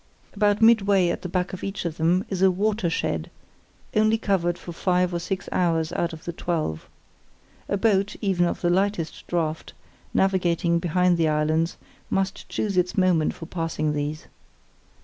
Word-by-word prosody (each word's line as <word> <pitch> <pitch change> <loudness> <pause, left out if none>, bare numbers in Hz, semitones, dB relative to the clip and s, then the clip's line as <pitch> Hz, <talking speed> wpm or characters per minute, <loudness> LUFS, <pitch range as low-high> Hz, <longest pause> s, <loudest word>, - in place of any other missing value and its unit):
About 210 +1 +2
midway 200 -5 +5
at - - -2
the 180 - -5
back 180 +1 -1
of 185 - -7
each 195 -2 -4
of 165 -2 -3
them 175 +4 +2
is 190 -2 -3
a 190 - +6
"watershed", 185 - -1 0.7
only 215 +1 +4
covered 180 -5 0
for 175 - -9
five 180 +1 +1
or 170 - -1
six 190 +2 -4
hours 165 -3 +1
out 170 - -1
of 160 -1 -10
the 170 - -4
twelve. 160 - -3 0.8
A 200 - +1
boat, 200 -1 +2
even 185 -4 +1
of - - -3
the 175 - +2
lightest 190 -3 -1
draught, 160 -2 -2 0.4
navigating 175 -3 +2
behind 180 +1 +2
the 165 -1 +2
islands 155 +2 +1 0.3
must 195 0 -2
choose 200 -3 -2
its 180 0 +1
moment 180 -5 +2
for 165 - -8
passing 165 -3 -2
these. 150 +1 -3
180 Hz, 165 wpm, -24 LUFS, 165-195 Hz, 0.8 s, a